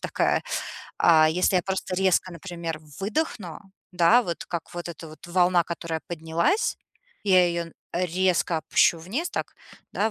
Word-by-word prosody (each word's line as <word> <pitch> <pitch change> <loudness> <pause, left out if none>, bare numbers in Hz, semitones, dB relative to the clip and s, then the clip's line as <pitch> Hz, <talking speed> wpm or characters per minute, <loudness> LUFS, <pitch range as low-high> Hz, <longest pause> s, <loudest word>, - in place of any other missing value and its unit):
такая. - - 0 0.6
А 155 -2 +6
если 180 +3 +2
я 180 - +2
просто 190 -1 -3
резко, 185 -1 +2
например, 170 -2 -6 0.2
выдохну, 205 - -2 0.3
да, 180 +8 +5
вот, 170 -5 -4
как 170 0 -6
вот 175 0 -5
эта 165 -1 -10
вот 155 - -13
волна, 175 0 +3
которая 165 -1 -4
поднялась, 170 - 0 0.5
я 185 -3 +5
ее 170 0 -1
н 165 - -13 0.2
резко 180 0 +1
опущу 165 +2 +3
вниз, 235 - -3
так, - - -4 0.4
да, 220 +2 0
175 Hz, 150 wpm, -25 LUFS, 165-190 Hz, 0.6 s, А